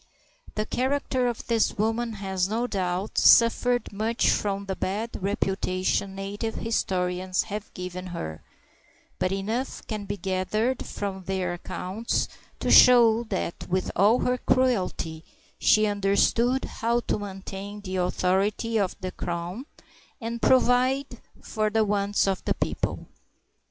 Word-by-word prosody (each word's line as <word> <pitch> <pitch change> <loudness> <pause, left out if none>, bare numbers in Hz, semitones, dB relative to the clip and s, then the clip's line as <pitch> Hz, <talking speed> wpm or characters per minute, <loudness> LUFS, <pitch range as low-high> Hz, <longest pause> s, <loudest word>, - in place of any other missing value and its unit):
The 215 - -1
character 260 0 0
of 240 -2 -3
this 230 -3 +1
woman 225 +2 0
has, 190 -2 -2
no 230 +3 0
doubt, 190 -3 -1
suffered 245 0 +4
much 220 +3 +1
from 200 -1 -1
the 190 -1 -3
bad 210 +6 -2
reputation 195 -1 -1
native 205 +3 -4
historians 185 -4 -1
have 210 0 -6
given 180 0 -6
her, 80 - -6 0.8
but 185 - +1
enough 220 +7 -3
can 215 -2 -4
be 205 +1 -4
gathered 200 +7 -1
from 190 -2 -5
their 185 -2 -1
accounts 190 +5 -3 0.3
to - - +1
show 235 -2 +7
that 190 -5 -4
with 185 +1 0
all 205 +6 +5
her 250 0 +1
cruelty 185 -12 0 0.4
she 215 0 +5
understood 210 +5 +2
how 235 +1 -1
to - - -2
maintain 200 +1 -7
the 190 -2 -4
authority 195 +5 +1
of 195 -3 0
the 185 0 -3
crown, 175 +11 -5 0.5
and 230 -1 -4
provide 255 0 +3 0.2
for 215 -1 -1
the 220 0 +2
wants 205 0 +1
of 195 -1 -1
the - - +1
people. - - -3
205 Hz, 130 wpm, -26 LUFS, 185-230 Hz, 0.8 s, show